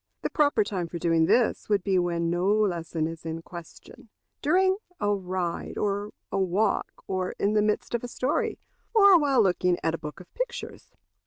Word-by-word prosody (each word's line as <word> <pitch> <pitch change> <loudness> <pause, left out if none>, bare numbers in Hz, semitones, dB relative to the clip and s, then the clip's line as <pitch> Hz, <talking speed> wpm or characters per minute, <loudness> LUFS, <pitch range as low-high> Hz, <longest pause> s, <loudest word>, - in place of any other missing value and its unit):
The - - -2
proper 290 - +3
time 190 -4 -3
for 170 - -6
doing 165 -1 +2
this 240 -3 +2
would 205 -3 +2
be 190 -2 +2
when 170 -1 0
no 175 +2 0
lesson 175 -6 +1
is 165 0 -6
in 165 0 -5
question 170 +6 -12 0.3
during 375 +5 +3 0.2
a 205 -4 +1
ride 185 -3 -3
or 205 0 -1 0.2
a 195 - 0
walk, 190 +3 0
or 185 -1 -2
in 205 +1 +1
the 210 - +3
midst 210 +2 -1
of 235 - -1
a - - -3
story, 255 +3 -1 0.4
or 400 -4 +8
while 275 -6 +3
looking 180 -2 +2
at 160 - +1
a 165 - -3
book 150 +3 -8
of 180 - -15
pictures. - - -6
195 Hz, 185 wpm, -27 LUFS, 170-220 Hz, 0.4 s, or